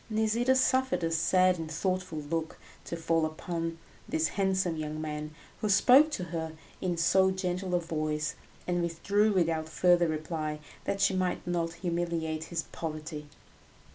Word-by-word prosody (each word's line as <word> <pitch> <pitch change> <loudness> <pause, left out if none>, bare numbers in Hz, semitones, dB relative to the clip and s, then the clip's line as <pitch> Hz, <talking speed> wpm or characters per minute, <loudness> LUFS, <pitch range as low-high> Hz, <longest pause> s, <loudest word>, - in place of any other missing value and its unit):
Nisida 220 +4 +2
suffered 260 -5 +2
a 165 - 0
sad 185 +2 +3
and 160 -1 -5
thoughtful 185 0 -2
look 160 +2 -3 0.3
to 170 - -4
fall 165 0 +1
upon 165 +1 -3 0.3
this 160 0 +1
handsome 190 -3 0
young 155 0 -4
man 150 0 -5 0.2
who 215 - -1
spoke 255 +9 +7
to 185 - -2
her 160 -1 -3 0.3
in 175 -2 -1
so 190 +3 +4
gentle 185 -1 -1
a - - +3
voice, 155 -2 -2 0.3
and 175 -1 0
withdrew 200 +6 +1
without 165 -4 +1
further 175 +1 +4
reply, 155 -1 -3 0.3
that 195 - -1
she - - +4
might 185 -1 -1
not 170 -1 -1
humiliate 170 -2 -2
his 165 -1 -3
poverty. 155 -2 -6
170 Hz, 150 wpm, -30 LUFS, 160-185 Hz, 0.3 s, spoke